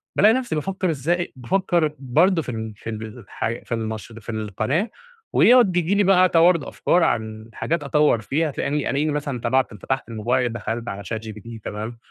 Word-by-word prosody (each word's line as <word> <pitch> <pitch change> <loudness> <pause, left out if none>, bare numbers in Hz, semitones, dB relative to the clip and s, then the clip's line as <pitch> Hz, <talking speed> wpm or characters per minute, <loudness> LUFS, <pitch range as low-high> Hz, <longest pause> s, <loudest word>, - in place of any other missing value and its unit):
بالاقي 215 +3 +6
نفْسي 245 -6 -1
بافكّر 185 +4 -1
إزاي 165 +4 -1
بافكّر 155 +3 0
برضه 165 +7 +3
في 140 - -8
ال 110 -1 -5
في 110 - -8
ال 110 +1 -7
ح - - -2 0.2
في - - -22
المش 110 -3 -3
في 110 - -13
القناة، 110 - -1 0.4
ويقعد 240 -4 +6
بييجي 175 +2 +1
لي 205 - +4
بقى 185 -1 +5
توارد 170 -1 +4
أفكار 180 - +1
عن 110 -5 -1
حاجات 170 +5 -2
أطوّر 145 -5 +3
فيها، 150 +7 0
تلاقيني 140 +1 -1
ألاقيني 150 +2 0
مثلًا 145 -3 -3
طبعت 130 +1 +1
فتحت 125 +6 -3
الموبايل، 120 +2 0
دخلت 115 0 -4
على 100 +1 -6
ChatGPT 110 +1 -7
تمام، 110 +3 -5
135 Hz, 175 wpm, -23 LUFS, 110-170 Hz, 0.4 s, بالاقي